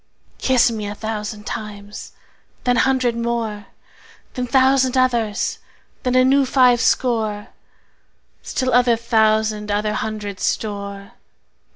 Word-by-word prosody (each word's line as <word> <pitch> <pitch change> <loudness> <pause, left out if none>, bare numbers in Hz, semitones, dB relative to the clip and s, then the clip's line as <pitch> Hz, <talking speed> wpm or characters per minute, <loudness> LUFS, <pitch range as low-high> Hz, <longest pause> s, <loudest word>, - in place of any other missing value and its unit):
Kiss 255 -2 +3
me 215 -2 -4
a 205 - -5
thousand 215 -1 -5
times, 205 -1 -7 0.5
then 245 -1 +2
hundred 255 -2 +2
more, 230 -3 -3 0.7
Then 250 -1 -3
thousand 260 0 +3
others, 235 -5 0 0.4
then 250 0 -1
a 255 0 +5
new 275 +1 +4
five 250 -2 +4
score, 220 -4 0 0.9
Still 255 -2 -2
other 245 -1 +4
thousand 220 -2 +1
other 210 +1 0
hundred 210 -3 -4
store. 200 -2 -3
225 Hz, 110 wpm, -20 LUFS, 210-250 Hz, 0.9 s, a